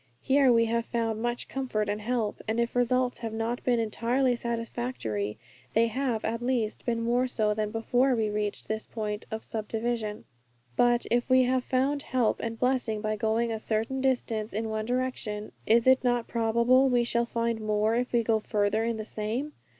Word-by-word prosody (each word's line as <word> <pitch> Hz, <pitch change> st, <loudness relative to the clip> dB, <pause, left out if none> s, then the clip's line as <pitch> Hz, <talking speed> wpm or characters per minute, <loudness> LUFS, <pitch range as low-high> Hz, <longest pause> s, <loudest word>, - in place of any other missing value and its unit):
Here 270 Hz, -1 st, +4 dB
we 230 Hz, -1 st, +4 dB
have 230 Hz, 0 st, 0 dB
found 225 Hz, -2 st, -1 dB
much 240 Hz, 0 st, -2 dB
comfort 245 Hz, -6 st, -2 dB
and 205 Hz, +1 st, -2 dB
help, 225 Hz, -1 st, -1 dB
and 220 Hz, +2 st, 0 dB
if 235 Hz, +1 st, -1 dB
results 250 Hz, +1 st, +1 dB
have 225 Hz, -2 st, -4 dB
not 225 Hz, +2 st, -2 dB
been 245 Hz, -2 st, +2 dB
entirely 240 Hz, +3 st, +1 dB
satisfactory, 230 Hz, -, -3 dB, 0.4 s
they 225 Hz, +1 st, +4 dB
have, 245 Hz, -2 st, -1 dB
at 230 Hz, +1 st, -2 dB
least, 240 Hz, -3 st, -1 dB
been 230 Hz, -1 st, 0 dB
more 245 Hz, +2 st, +2 dB
so 215 Hz, -4 st, +1 dB
than 215 Hz, 0 st, -1 dB
before 245 Hz, +4 st, +2 dB
we 220 Hz, -2 st, +1 dB
reached 210 Hz, 0 st, -3 dB
this 220 Hz, 0 st, -3 dB
point 210 Hz, -2 st, -4 dB
of 220 Hz, 0 st, -5 dB
subdivision. 220 Hz, 0 st, -3 dB, 0.5 s
But 240 Hz, -, +3 dB
if 240 Hz, +2 st, +1 dB
we 255 Hz, 0 st, +6 dB
have 255 Hz, 0 st, +1 dB
found 270 Hz, +3 st, +1 dB
help 250 Hz, -5 st, 0 dB
and 230 Hz, 0 st, -4 dB
blessing 250 Hz, -3 st, +1 dB
by 215 Hz, 0 st, -1 dB
going 225 Hz, +2 st, 0 dB
a 220 Hz, -, -2 dB
certain 225 Hz, +5 st, -1 dB
distance 235 Hz, -5 st, 0 dB
in 220 Hz, +2 st, -2 dB
one 215 Hz, 0 st, -2 dB
direction, 245 Hz, -4 st, -2 dB, 0.2 s
is 230 Hz, +1 st, +4 dB
it 260 Hz, 0 st, +5 dB
not 245 Hz, -2 st, +1 dB
probable 235 Hz, +3 st, +3 dB
we 245 Hz, -1 st, +3 dB
shall 235 Hz, 0 st, 0 dB
find 230 Hz, -1 st, -1 dB
more 215 Hz, +1 st, +1 dB
if 245 Hz, +2 st, 0 dB
we 235 Hz, -1 st, +2 dB
go 220 Hz, -1 st, +2 dB
farther 210 Hz, 0 st, 0 dB
in 230 Hz, -1 st, -1 dB
the 215 Hz, -, -5 dB
same? 225 Hz, +8 st, -3 dB
230 Hz, 190 wpm, -28 LUFS, 220-245 Hz, 0.5 s, we